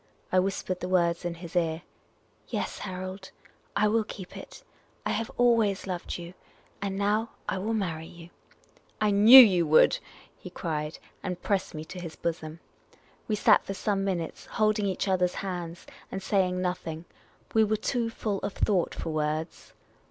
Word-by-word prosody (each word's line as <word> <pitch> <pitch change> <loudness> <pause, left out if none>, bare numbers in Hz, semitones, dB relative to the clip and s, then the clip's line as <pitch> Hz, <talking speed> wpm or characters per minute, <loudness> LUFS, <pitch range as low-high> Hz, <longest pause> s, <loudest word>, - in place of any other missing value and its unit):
I 185 - +4
whispered 185 -1 -2
the 180 - -4
words 170 -2 +2
in 175 -1 -2
his 170 0 -10
ear. 165 -1 0 0.3
" - - -37 0.3
Yes, - - -3
Harold, 185 0 -6 0.5
I 210 +1 +3
will 220 +1 +2
keep 190 -3 -9
it. - - -10 0.4
I - - 0
have 225 +2 -2
always 230 -5 +3
loved 180 -2 -4
you. 175 0 -9 0.5
And 195 -1 -2
now 210 +3 +1 0.2
I 195 - -1
will 220 +4 -1
marry 165 -6 -3
you. 170 0 -13 0.2
' - - -30
' - - -32
" - - -35
I 210 -1 +3
knew 215 +6 +10
you 185 -9 +7
would! 155 - +5 0.2
" - - -25
he - - -7
cried, 155 -2 -4 0.2
and 180 -2 -4
pressed 195 -4 -1
me 155 0 -6
to 180 +3 -8
his 165 -3 -7
bosom. 160 0 -4 0.7
We 215 - +1
sat - - +5
for 195 - -5
some 195 0 -1
minutes, 180 -4 -3
holding 215 -1 +1
each 190 +1 -1
other's 180 -2 +1
hands, 175 -3 -5 0.3
and 190 0 -5
saying 185 -2 +1
nothing; 175 -3 -3 0.5
we 220 - +5
were 215 0 +1
too 235 +1 -1
full 210 -3 -3
of 200 - -4
thought 190 -5 +1
for 160 - -4
words. 155 +1 -3
185 Hz, 180 wpm, -28 LUFS, 170-205 Hz, 0.7 s, knew